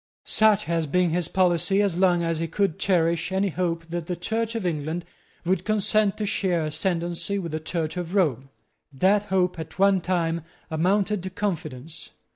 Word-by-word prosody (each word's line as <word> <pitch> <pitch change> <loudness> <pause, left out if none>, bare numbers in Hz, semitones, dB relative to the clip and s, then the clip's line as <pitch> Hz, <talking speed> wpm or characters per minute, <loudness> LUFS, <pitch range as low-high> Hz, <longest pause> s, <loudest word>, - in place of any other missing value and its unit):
Such 215 -1 +4
had 165 -6 -1
been 180 -2 +3
his 175 -1 0
policy 185 +1 +2
as 200 -4 +2
long 175 -1 +3
as 165 -1 0
he 165 - -1
could 185 0 0
cherish, 170 -2 +1
any 195 +1 +1
hope 170 -1 -2
that 170 -1 -4
the 180 - -2
Church 225 +6 -2
of 225 -5 -2
England 160 +1 -2 0.4
would 185 +2 +1
consent 215 -1 +2
to 215 - -2
share 180 -5 0
ascendency 170 +4 -1
with 170 -5 -4
the 155 - -2
Church 160 +1 -3
of 175 +1 -4
Rome. 135 - +1 0.4
That 195 +9 +2
hope 185 -3 +1
at 160 - -8
one 195 -1 +4
time 170 -2 0 0.3
amounted 195 +5 +1
to 185 - -5
confidence. 160 -7 -5
175 Hz, 175 wpm, -25 LUFS, 165-195 Hz, 0.4 s, Such